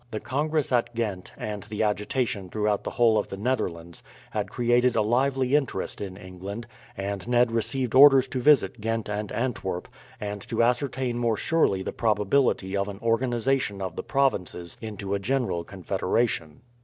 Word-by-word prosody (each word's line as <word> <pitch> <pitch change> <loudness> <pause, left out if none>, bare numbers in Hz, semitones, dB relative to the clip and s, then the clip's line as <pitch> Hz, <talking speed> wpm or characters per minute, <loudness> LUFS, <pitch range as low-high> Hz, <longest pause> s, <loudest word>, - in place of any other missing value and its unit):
The 110 -3 -4
congress 150 +5 -1
at 120 -1 +1
Ghent, 105 -6 -3
and 105 -1 -4
the 105 +3 -3
agitation 105 -1 -1
throughout 105 0 0
the - - -3
whole 115 -3 +3
of - - -3
the 95 - -7
Netherlands, 85 -8 -2 0.3
had 105 -2 -2
created 120 +1 +2
a 110 - +3
lively 130 +3 +1
interest 135 -10 -1
in 95 -2 -6
England, 95 +4 -7 0.3
and 100 +1 -4
Ned 120 -1 +3
received 120 +2 -1
orders 135 -1 +8
to 130 - -2
visit 120 -6 +4
Ghent 115 -1 -2
and 105 0 -3
Antwerp, 110 -7 -2 0.3
and 105 -2 -4
to - - +1
ascertain 125 0 0
more 115 -2 +1
surely 100 -13 +1
the - - -4
probability 105 -2 +1
of 100 0 0
an 100 -1 -6
organization 120 -1 0
of 95 -3 -4
the - - -3
provinces 90 -10 -1
into 100 -3 -5
a 100 - 0
general 120 -6 -1
confederation. 95 -2 -1
110 Hz, 165 wpm, -26 LUFS, 100-125 Hz, 0.3 s, orders